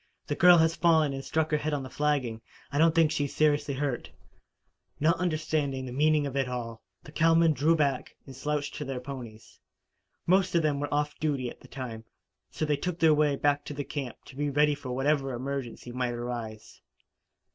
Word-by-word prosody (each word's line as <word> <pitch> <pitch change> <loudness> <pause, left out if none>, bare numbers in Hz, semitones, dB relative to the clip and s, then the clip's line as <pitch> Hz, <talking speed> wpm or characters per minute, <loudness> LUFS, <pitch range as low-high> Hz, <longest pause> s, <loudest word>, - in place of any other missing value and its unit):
The - - -2
girl 175 +2 +7
has 160 0 +3
fallen 160 -4 +3
and 135 0 -5
struck 160 +2 -1
her 150 - +3
head 150 0 -1
on 140 - -3
the - - -6
flagging. 140 -7 -1 0.3
I 145 - -1
don't 160 0 +4
think 165 -2 +4
she 145 -3 0
is 140 - -7
seriously 145 -2 +2
hurt." 135 -2 -2 0.9
Not 160 +4 +2
understanding 155 -6 -1
the 125 - -6
meaning 150 +3 +2
of 140 -1 -5
it 135 -2 0
all, 115 -2 -5 0.2
the - - -12
cowmen 165 0 +4
drew 155 +4 +3
back 140 -4 -1
and 135 - -11
slouched 145 +1 -2
to - - -4
their 135 -2 -4
ponies. 125 -5 -9 0.7
Most 185 0 +3
of 170 - +3
them 145 -2 +1
were 145 0 -3
off 150 0 -1
duty 140 -6 -1
at - - -14
the - - -16
time, 120 -4 -7 0.5
so 155 - -3
they 150 -1 +1
took 180 +3 -3
their 160 -2 +5
way 150 -1 +2
back 145 +1 +1
to 145 -1 -4
camp 135 -3 -5
to - - -13
be 145 +1 -1
ready 150 +1 +3
for 145 -3 -7
whatever 135 +1 0
emergency 130 -1 -5
might 125 -1 -2
arise. 120 -2 -6
145 Hz, 200 wpm, -28 LUFS, 130-155 Hz, 0.9 s, girl